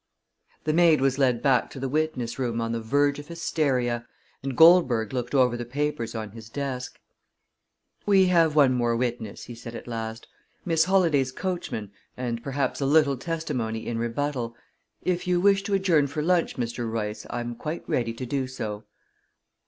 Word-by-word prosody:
The 155 - 0
maid 165 -2 +5
was 135 0 +1
led 125 -4 +2
back 135 -3 +3
to 135 - -9
the 135 - -2
witness 135 -4 -1
room 120 -3 -1
on 115 0 -1
the 115 0 -2
verge 145 +5 +1
of 145 - -10
hysteria, 130 -8 -1 0.3
and 135 -2 -4
Goldberg 150 - +6
looked 125 +1 -2
over 125 -3 +4
the 120 - -4
papers 125 -2 -3
on 110 -2 -5
his 110 0 -11
desk. 130 -1 -4 1.1
"We 195 -2 +6
have 165 -4 +3
one 140 -4 +5
more 120 -2 +1
witness," 120 -3 -3
he 120 - -8
said 115 0 -9
at - - -8
last, 115 -1 -5 0.4
"Miss 165 -2 +3
Holladay's 165 -9 +3
coachman, 130 - -4 0.3
and 120 -2 -3
perhaps 135 +1 -2
a 135 - +1
little 145 -1 +4
testimony 130 -7 -3
in 115 -1 -2
rebuttal. 120 0 -2 0.5
If 180 0 -1
you 180 -1 +2
wish 195 +1 +4
to 200 - +1
adjourn 175 -7 +3
for 150 +2 -3
lunch, 175 0 +2
Mr. 120 -1 -3
Royce, 105 -1 -4
I'm 120 0 -3
quite 155 +8 -6
ready 115 -2 0
to 130 - -5
do 130 +1 -2
so." 110 -5 -5
130 Hz, 175 wpm, -26 LUFS, 115-155 Hz, 1.1 s, Goldberg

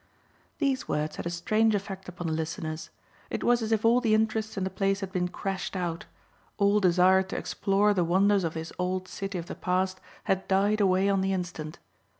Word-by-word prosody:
These 275 -3 0
words 150 +1 -2
had - - -4
a - - -1
strange 215 +6 +2
effect 195 -2 -5
upon 175 -1 -7
the 160 - -1
listeners. 160 0 -4 0.4
It - - -3
was 240 0 +3
as 220 0 -2
if 220 0 +1
all 235 +2 +5
the 220 -3 +3
interest 220 0 0
in 190 - -1
the 190 - -2
place 195 +1 0
had 190 -1 -4
been 180 -2 0
crashed 195 +2 -4
out; 170 -2 -3 0.5
all 205 0 +4
desire 185 0 +5
to 190 +1 -5
explore 205 +1 +1
the 180 -3 +2
wonders 195 +3 +3
of 165 -1 -2
this 160 0 -5
old 185 +1 -1
city 195 0 -5
of 170 - -5
the - - -6
past 185 +1 -1 0.2
had 190 0 0
died 200 +2 +2
away 190 0 +3
on 195 -1 +2
the 190 0 0
instant. 175 -4 -4
190 Hz, 205 wpm, -28 LUFS, 180-205 Hz, 0.5 s, all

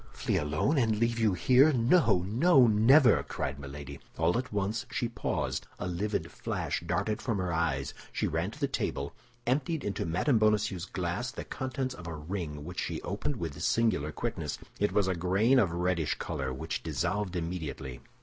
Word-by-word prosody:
"Flee - - 0
alone, 75 - +1
and 110 -3 +2
leave 115 +1 +1
you 110 -4 +3
here? 130 - +5
No, 120 - +3
no, 130 - +5
never!" 115 +3 +6
cried 70 +1 -4
Milady. 70 0 -8 0.2
All 80 +2 +2
at 125 +1 -2
once 105 +4 -1
she 125 0 -1
paused, 115 -3 -2
a - - -4
livid 100 +4 -2
flash - - -3
darted 100 +5 -1
from 115 -5 -1
her 90 -2 -1
eyes; 80 -5 0 0.2
she - - -1
ran - - -1
to - - -12
the - - +1
table, 70 +1 -2 0.3
emptied 140 +5 0
into 100 - -2
Mme. 110 - +2
Bonacieux's 105 -4 +2
glass 90 +7 -2
the 115 - -6
contents 130 0 -3
of 90 -6 -9
a 85 - -4
ring 75 -2 -5
which 90 +2 -5
she - - -2
opened 105 +10 -2
with 80 - -5
singular 110 -11 +1
quickness. - - -3 0.2
It 105 - +2
was 100 -2 +2
a 95 - +2
grain 95 +9 +3
of 100 -7 +3
a 85 - -5
reddish 90 -3 0
color, 70 -5 -3
which 80 +6 -4
dissolved 85 +5 -2
immediately. 80 -7 -4
95 Hz, 180 wpm, -30 LUFS, 85-115 Hz, 0.3 s, never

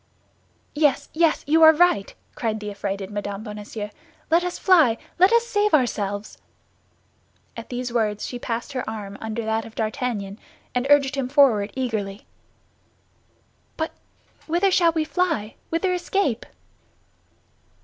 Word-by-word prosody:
"Yes, 295 -1 +1
yes! 325 -1 +2
You 320 +3 +3
are 315 0 +10
right," 345 - +2 0.2
cried 220 -2 -2
the 210 -1 -5
affrighted 200 -1 -4
Mme. 205 0 -4
Bonacieux; 210 -1 -6 0.4
"let 335 +2 +4
us 360 0 -3
fly! 315 - +4 0.2
Let 370 +3 +6
us 470 0 +4
save 420 -5 +2
ourselves." 205 -6 -2 1.2
At 230 0 -8
these 245 -1 -4
words 210 -3 0
she 245 - -6
passed 235 +4 -4
her 255 -4 -3
arm 205 -2 -6
under 220 +1 -4
that 220 0 0
of 225 - -12
D'Artagnan, 215 -2 -3 0.3
and 250 +2 0
urged 285 -1 +5
him 270 -3 -2
forward 255 -8 +4
eagerly. 215 -6 -3 1.5
"But 320 0 -2 0.6
whither 350 +4 +2
shall 345 -2 +4
we 320 -1 0
fly—whither 330 - -1
escape?" 355 - -1
245 Hz, 130 wpm, -23 LUFS, 210-320 Hz, 1.5 s, are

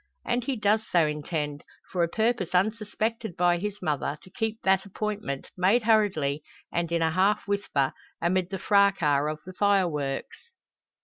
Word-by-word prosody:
And 240 0 0
he 270 - -1
does 215 0 +2
so 170 -3 +4
intend, 150 -1 -3 0.3
for 180 - 0
a 170 - +3
purpose 220 -3 0
unsuspected 215 +1 -1
by 175 0 +3
his 205 0 -5
mother, 150 -2 -1
to 185 - -16
keep 225 +2 -2
that 190 0 +3
appointment, 205 -7 -4
made 195 +6 +3
hurriedly, 190 -10 +2 0.3
and 170 -1 -1
in 170 -1 +1
a 160 - +2
half 195 +5 +2
whisper, 200 -10 0 0.3
amid 180 +1 +1
the 190 - -3
fracas 175 -9 +3
of 155 - -5
the 185 - -9
fireworks. 175 -9 0
185 Hz, 160 wpm, -27 LUFS, 160-210 Hz, 0.3 s, so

